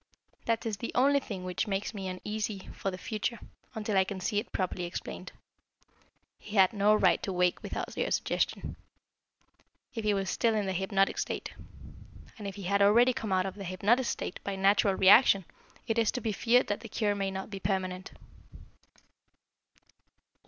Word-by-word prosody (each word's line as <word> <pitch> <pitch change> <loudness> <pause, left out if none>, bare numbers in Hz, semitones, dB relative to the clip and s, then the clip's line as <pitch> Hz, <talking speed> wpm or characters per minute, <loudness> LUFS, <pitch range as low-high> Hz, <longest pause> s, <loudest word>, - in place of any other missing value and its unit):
That 230 0 0
is 220 -3 -2
the 235 - -5
only 280 +3 +4
thing 200 -8 -7
which 185 +4 -2
makes 200 +2 -2
me 195 -3 -5
uneasy 205 +2 -4
for 195 - -3
the 185 - -6
future, 215 +4 -3 0.4
until 215 -1 -2
I 190 - +5
can 190 0 -6
see 205 +3 0
it 225 - -8
properly 185 -1 -2
explained. 175 - -6 1.1
He 210 - -9
had 190 0 +5
no 210 +1 +4
right - - +3
to 195 - -3
wake 180 -1 +1
without - - -5
your - - -1
suggestion, - - -1 1.2
if 225 - -4
he 210 -1 +2
was 195 -1 -1
still 230 -2 +1
in 210 -2 0
the 190 - -1
hypnotic 195 +1 +1
state; - - -3 0.9
and 205 - -5
if 195 - -6
he 200 - -8
had 200 +2 +1
already 235 +5 +5
come 220 -3 -4
out 185 0 +2
of 190 - -3
the 200 - -8
hypnotic 205 +7 +1
state - - -4
by 200 - -3
a - - -5
natural 195 0 +3
reaction, 195 0 +6 0.4
it 230 -1 0
is 225 - +3
to - - -2
be 225 -2 -2
feared 240 +4 +3
that 205 - -2
the 230 -1 -10
cure 210 -1 0
may 195 -1 -1
not 190 +2 -6
be 195 - -5
permanent." 185 -1 -2
200 Hz, 185 wpm, -30 LUFS, 190-220 Hz, 1.2 s, reaction